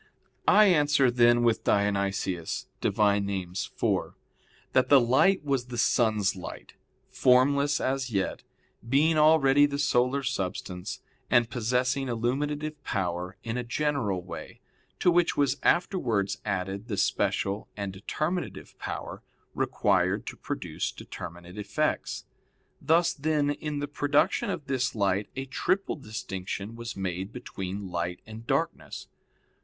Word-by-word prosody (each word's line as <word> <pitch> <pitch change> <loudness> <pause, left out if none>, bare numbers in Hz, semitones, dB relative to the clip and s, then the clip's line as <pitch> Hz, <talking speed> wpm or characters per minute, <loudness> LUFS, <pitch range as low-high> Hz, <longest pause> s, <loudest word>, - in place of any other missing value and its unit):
I 215 +1 +7
answer, 145 -7 +4
then, 120 0 +4
with 115 -2 +2
Dionysius 100 -4 0 0.2
(Div. - - -1
Nom. 100 -1 +3
iv), 95 -2 -2 0.6
that 130 - +3
the 140 - +8
light 135 +11 +3
was 135 -4 0
the 125 -1 -6
sun's 110 -5 +2
light, 90 - -9 0.4
formless 140 +3 +4
as 130 -1 -1
yet, 100 -4 -1 0.5
being 155 +4 +4
already 145 -2 +6
the 140 0 -3
solar 135 0 +2
substance, 100 -2 -4 0.3
and 120 -2 +3
possessing 125 +3 0
illuminative 145 +6 -2
power 90 -2 -3
in 115 +1 -3
a 125 - -2
general 120 -7 -1
way, 90 - -9 0.4
to 180 - +3
which 175 0 +2
was 140 -1 +2
afterwards 115 - +1
added 100 +1 -3
the 105 -5 -3
special 100 +1 0
and 100 -2 -4
determinative 155 - -4
power - - -5 0.3
required - - +1
to - - -6
produce - - -4
determinate 85 +4 -9
effects. 105 - -2 0.6
Thus, 165 +2 +3
then, 150 -1 +1
in 150 0 -4
the 145 0 -2
production 145 +1 +1
of 145 - -4
this 135 -3 -1
light 100 -1 0
a 135 0 -3
triple 185 +9 0
distinction 105 -4 -6
was 115 -1 -6
made 95 +1 -3
between 100 -5 -6
light 85 +1 -3
and 110 +1 -10
darkness. - - -2
120 Hz, 130 wpm, -28 LUFS, 100-145 Hz, 0.6 s, the